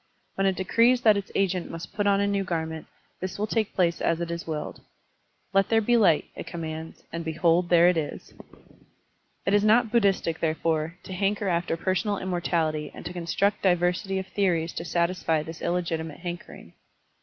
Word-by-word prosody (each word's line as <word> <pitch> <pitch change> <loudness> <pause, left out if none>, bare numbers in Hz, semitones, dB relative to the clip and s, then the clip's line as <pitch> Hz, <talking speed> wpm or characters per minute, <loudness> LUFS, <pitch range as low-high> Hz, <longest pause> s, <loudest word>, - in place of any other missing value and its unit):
When 195 0 +1
it 190 - +1
decrees 230 +7 +3
that 215 -3 +6
its 200 -1 -4
agent 185 -2 0
must 165 +3 -8
put 205 0 0
on 200 0 +4
a 200 - +2
new 200 -1 0
garment, 160 -3 -3 0.3
this 185 0 -4
will 210 - 0
take 215 -1 -1
place 170 -2 +1
as 165 0 +1
it 170 -1 -3
is 170 0 -5
willed. 155 -2 -5 0.7
"Let 195 0 +3
there 225 - +4
be 240 +2 +2
light," 195 -9 +4
it - - -7
commands, 160 -1 -6
and 165 0 -3
behold 170 +2 +2
there 175 0 +6
it 180 -1 +3
is! 155 -2 -5 1.1
It 195 - +1
is 205 0 +4
not 220 +1 +4
Buddhistic, 195 -7 +2
therefore, 160 0 0
to 190 - -8
hanker 200 +2 0
after 170 -1 0
personal 190 +4 0
immortality 165 -5 -1
and - - -10
to 175 - -5
construct 180 +4 0
diversity 180 +1 +1
of 190 - -3
theories 175 -5 0
to 170 - -5
satisfy 170 -2 0
this 160 +1 -9
illegitimate 165 -3 -2
hankering. 175 0 -8
175 Hz, 180 wpm, -26 LUFS, 165-195 Hz, 1.1 s, that